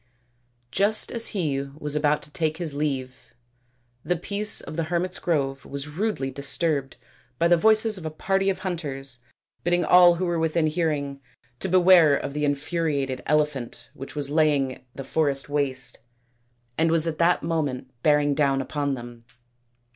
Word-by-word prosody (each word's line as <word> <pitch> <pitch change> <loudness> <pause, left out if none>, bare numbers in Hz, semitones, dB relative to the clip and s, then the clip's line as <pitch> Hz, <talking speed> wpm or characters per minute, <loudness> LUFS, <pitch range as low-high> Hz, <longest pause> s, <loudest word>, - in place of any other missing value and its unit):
Just 205 +3 +2
as 230 -1 0
he 155 -10 -1
was 145 +2 -6
about 150 0 +1
to 150 - -5
take 160 -3 -1
his 165 -4 -4
leave 130 -4 -4 0.7
the 180 - 0
peace 205 +5 0
of - - -7
the 165 0 -1
hermits' 175 +2 -1
grove 140 -5 -1
was 140 +1 -5
rudely 155 -4 -2
disturbed 140 0 -2 0.4
by 170 - +3
the 175 - +5
voices 215 +2 +3
of 165 - -10
a - - -2
party 195 +5 0
of 190 - -1
hunters 135 -8 -2 0.4
bidding 175 -1 +1
all 175 0 +7
who 185 +2 -2
were 170 -1 -1
within 160 0 +1
hearing 150 -4 -1 0.4
to 190 - -2
beware 175 -5 +6
of 140 - -5
the 150 0 -1
infuriated 145 -2 -1
elephant 150 -5 -1
which 135 +3 -9
was 145 -1 -3
laying 145 -5 +1
the 135 - -6
forest 140 0 -1
waste 130 -3 -2 0.8
and 165 +1 +3
was 165 -1 +4
at 160 -2 -3
that 170 -1 +3
moment 145 -6 -2
bearing 145 0 +3
down 140 -2 +2
upon 140 0 -2
them. 120 -1 -10
150 Hz, 160 wpm, -25 LUFS, 140-170 Hz, 0.8 s, all